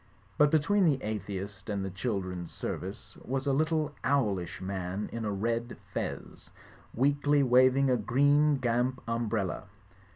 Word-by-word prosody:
But 150 0 +6
between 180 +6 +3
the 150 -5 +3
atheist 100 -1 -5
and 100 -2 -2
the 95 - -4
children's 95 -4 -3
service - - -6
was 135 +2 -2
a 140 - +2
little 155 0 +1
owlish 105 -11 0
man 95 +1 -4
in 115 -1 -3
a 105 - -1
red 115 +4 -2 0.2
fez, - - -5 0.4
weakly 145 +2 +2
waving 130 +1 +4
a 125 - +3
green 145 +6 +3
gamp 125 +1 0
umbrella. 115 -5 -1
120 Hz, 135 wpm, -30 LUFS, 100-140 Hz, 0.4 s, But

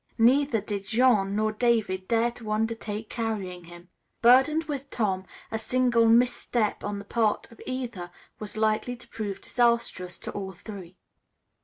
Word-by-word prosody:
Neither 245 0 +4
did 200 -1 -5
Jean 220 -4 +3
nor 215 +1 +1
David 215 -5 +1
dare 230 +1 +2
to 230 -3 -7
undertake 220 0 -2
carrying 200 -7 -3
him. 175 +1 -13 0.3
Burdened 265 +7 +6
with 280 -3 -5
Tom, 190 -7 -1 0.2
a 220 - -2
single 245 -1 +3
misstep 235 -1 +2
on 205 0 -3
the 200 - -8
part 220 +1 0
of 230 - -15
either 240 -9 -4 0.3
was 210 0 -6
likely 220 +3 +1
to 235 - -17
prove 205 -3 -5
disastrous 235 -7 0
to - - -6
all 190 -1 -5
three. 190 -1 -10
220 Hz, 150 wpm, -27 LUFS, 200-240 Hz, 0.3 s, Burdened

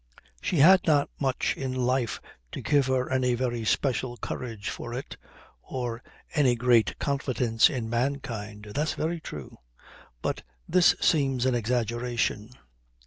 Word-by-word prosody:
"She 175 - -1
had 185 +6 +7
not 145 -3 +3
much 135 -2 0
in 130 -1 -3
life 125 -1 0 0.3
to - - -4
give 145 -3 +3
her 130 -1 0
any 125 -1 +2
very 120 -2 -2
special 125 +1 0
courage 115 -5 -5
for 120 0 -6
it, 130 - -6 0.5
or 120 - -4 0.3
any 135 -6 +3
great 120 -1 +3
confidence 130 -5 +2
in 125 -5 -3
mankind. 115 -4 -3
That's 150 +2 -1
very 165 +2 -2
true. 75 - -9 0.6
But - - -1 0.3
this 180 0 +5
seems 135 -5 +2
an 130 - +2
exaggeration." 120 -2 -1
125 Hz, 135 wpm, -27 LUFS, 120-140 Hz, 0.6 s, had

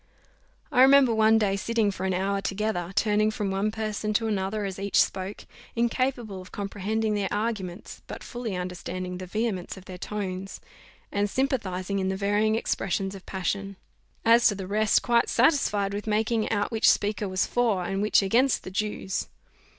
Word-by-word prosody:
I 250 - +4
remember 265 -2 +7
one 220 0 +5
day 205 -3 +1
sitting 220 +1 +1
for 190 0 -3
an 190 - 0
hour 195 +2 0
together, 195 -3 -2
turning 215 0 +3
from 210 -2 -2
one 195 +2 0
person 215 -1 -3
to 225 - +2
another 205 0 -1
as 190 -1 -5
each 200 0 +1
spoke, 190 +1 -1 0.3
incapable 235 -4 -1
of 185 - -14
comprehending 210 +2 -2
their 205 -2 -1
arguments, 205 -4 -3
but - - -8
fully 240 -5 -5
understanding 180 0 -5
the 185 - -7
vehemence 205 -2 -2
of 190 - -12
their 180 -1 -9
tones, 195 -2 -5 0.5
and 205 0 0
sympathizing 200 -8 -1
in 190 0 0
the 190 - -2
varying 205 +2 +2
expression 195 -3 -1
of 190 - -12
passion; 195 +1 -3 0.5
as 230 +1 +6
to 205 - +2
the 190 -1 -5
rest, 215 +2 +2
quite 235 -1 +3
satisfied 230 -7 +2
with 205 +2 -5
making 220 +1 +1
out 205 0 0
which 225 -1 +4
speaker 205 -1 +1
was 185 +1 +1
for, 225 -7 +1
and 195 +2 -2
which 210 -1 +4
against 240 +7 +2
the 185 - -7
Jews. 195 -1 -2
205 Hz, 175 wpm, -26 LUFS, 190-220 Hz, 0.5 s, remember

